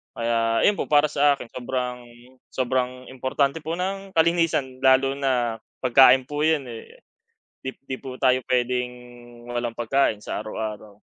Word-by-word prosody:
Kaya 115 -1 +1
'yon 205 - +3
po - - -2
para 150 0 +3
sa 145 -1 +3
akin 120 -4 -11
sobrang, 125 -1 -4 0.5
sobrang 130 0 -2
importante 135 +3 -1
po 160 +2 -4
ng 195 +2 -4
kalinisan 165 -6 +1
lalo 135 0 +4
na 125 -5 -1 0.2
pagkain 130 +1 +6
po 145 +3 -6
yun, 155 -3 +2
eh, 115 - -12 0.6
'di 130 - -6
di 130 - -4
po 130 -1 -8
tayo 130 -1 +3
p'wedeng 125 0 +1 0.6
walang 120 -1 -3
pagkain 120 -1 +1
sa 105 - -5
araw-araw. 110 -1 -6
130 Hz, 145 wpm, -24 LUFS, 120-140 Hz, 0.6 s, pagkain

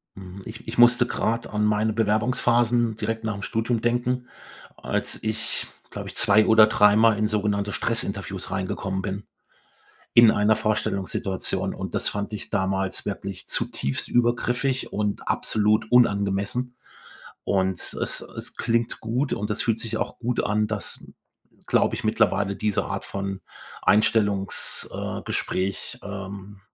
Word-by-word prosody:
Mhm. 95 0 -10
Ich 115 +1 -10
ich 115 +1 -6
musste 120 0 +6
grad 115 0 -1
an 105 0 -1
meine 105 +1 +2
Bewerbungsphasen 115 +1 +2
direkt 110 +1 -3
nach 105 -2 -1
'm 100 - -7
Studium 115 +3 -1
denken, 120 +1 0 0.5
als - - -2
ich, 110 +1 0 0.2
glaube - - -6
ich, - - -9
2 105 +2 +5
oder 110 -1 +7
3 105 -1 +5
Mal 110 -1 +5
in 105 - +2
sogenannte 105 -1 0
Stressinterviews 100 -4 -2
reingekommen 95 0 -2
bin 100 +1 -4 0.9
in 120 -2 +8
einer 105 +1 +3
Vorstellungssituation. 100 -3 -1
Und - - -6
das - - 0
fand 100 +1 -4
ich 105 - -6
damals 95 0 -1
wirklich 100 -2 -5
zutiefst 70 0 -2
übergriffig 120 +2 0
und 105 0 -2
absolut 105 +1 +1
unangemessen. 105 +1 +2 0.7
Und 95 -1 -1
es - - -1
es - - -8
klingt 115 0 0
gut 125 +5 -1
und 105 +1 -3
es - - -1
fühlt 115 -1 0
sich 110 -1 -3
auch - - -3
gut 120 0 -1
an, 105 +1 +1
dass, 105 -2 -3 0.6
glaube - - +2
ich, - - -6
mittlerweile 100 0 +1
diese 105 -2 0
Art - - -4
von 100 -1 -4 0.4
Einstellungs 105 -2 +2
äh, - - -4
Gespräch, 95 +1 -3
ähm, 100 0 -8
105 Hz, 140 wpm, -24 LUFS, 100-115 Hz, 0.9 s, in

